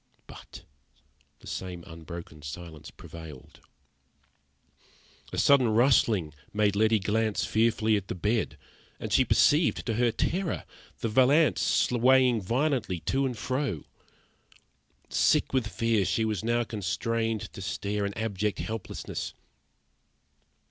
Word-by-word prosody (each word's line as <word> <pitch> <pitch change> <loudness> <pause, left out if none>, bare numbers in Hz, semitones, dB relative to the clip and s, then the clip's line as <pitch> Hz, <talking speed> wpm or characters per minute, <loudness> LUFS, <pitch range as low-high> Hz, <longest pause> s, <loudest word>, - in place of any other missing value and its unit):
But - - -12 0.8
the - - -16
same 90 -2 -6
unbroken 80 -2 -9
silence 80 +2 -8
prevailed. 80 -6 -12 1.7
A - - -5
sudden 140 -4 +5
rustling 110 - +3 0.2
made 105 -1 +1
Letty 110 +1 +3
glance 110 +1 0
fearfully 110 -1 +2
at 95 -1 -6
the - - -4
bed; 105 +5 -1 0.4
and - - -4
she - - +5
perceived, 150 +2 +3
to 115 - -1
her 120 +1 +2
terror, 175 - -2 0.4
the - - 0
valance 135 +7 +4
swaying 125 -1 +3
violently, 120 - -1
to 135 0 0
and 125 -3 -5
fro. 130 - -2 1.3
Sick - - +2
with 130 -4 +1
fear, 115 -2 +1
she 110 +4 0
was 110 -3 -2
now 120 +1 +1
constrained 110 0 -2
to - - -8
stare 100 +1 -2
in 100 0 -3
abject 105 -2 -2
helplessness. 110 -2 -5
110 Hz, 120 wpm, -28 LUFS, 95-120 Hz, 1.7 s, sudden